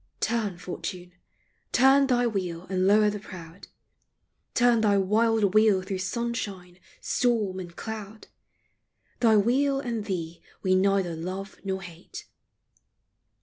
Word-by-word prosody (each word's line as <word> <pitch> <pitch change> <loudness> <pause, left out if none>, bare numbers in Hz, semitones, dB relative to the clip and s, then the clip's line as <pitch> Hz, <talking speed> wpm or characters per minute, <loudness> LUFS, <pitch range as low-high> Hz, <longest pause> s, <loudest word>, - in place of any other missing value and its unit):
Turn, 215 -6 -1
Fortune, 180 0 -6 0.6
turn 270 +2 +5
thy 245 -1 +2
wheel 180 -6 -3
and 185 0 +1
lower 210 +1 +5
the 210 - -5
proud; 180 -3 -11 0.9
Turn 240 -2 +4
thy 205 -2 +3
wild 210 +1 +2
wheel 215 -3 +4
through 190 0 -4
sunshine, 190 -4 -4 0.2
storm, 215 -6 0
and 175 -2 -9
cloud; 220 -1 -7 0.9
Thy 225 -3 +5
wheel 270 +6 +2
and 235 -5 -3
thee 170 -4 -4 0.2
we 185 -1 +2
neither 190 -2 +2
love 185 +4 -6
nor 190 -1 -3
hate. 175 0 -10
200 Hz, 120 wpm, -26 LUFS, 185-225 Hz, 0.9 s, turn